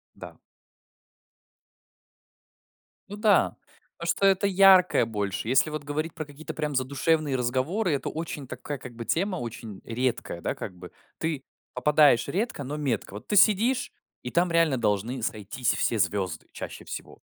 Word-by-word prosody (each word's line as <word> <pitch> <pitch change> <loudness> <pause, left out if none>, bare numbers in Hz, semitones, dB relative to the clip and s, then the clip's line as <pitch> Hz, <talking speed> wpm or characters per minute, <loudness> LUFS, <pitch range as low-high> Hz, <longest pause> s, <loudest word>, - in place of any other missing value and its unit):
Да. - - -10 2.7
Ну 205 - -7
да. 210 -2 +3 0.4
Потому 170 - -6
что 195 - +1
это 195 +1 +4
яркое 185 -8 +6
больше. 105 -1 -3
Если 135 +5 +3
вот 155 -1 -5
говорить 155 +3 -3
про 155 - -4
какие-то 145 +2 -8
прям 150 -2 -2
задушевные 140 +2 +1
разговоры, 130 - 0
это 135 - -2
очень 155 -4 -5
такая, 145 +2 -6
как 125 -2 -9
бы, 115 -1 -6
тема, 190 +3 0
очень 115 - -7
редкая, 120 -7 -2
да, - - -2
как 90 - -7
бы, 90 0 -11 0.3
ты 155 -4 -2 0.3
попадаешь 145 0 +4
редко, 195 - -2
но 145 +3 -4
метко. 125 -9 -2
Вот 105 - -9
ты 210 - 0
сидишь, 215 +5 +4 0.3
и 125 - -5
там 175 0 +2
реально 165 -5 +3
должны 115 +4 -1
сойтись 110 +4 -1
все 115 - 0
звёзды 90 -3 -1
чаще - - -8
всего. - - -8
145 Hz, 150 wpm, -27 LUFS, 120-170 Hz, 2.7 s, яркое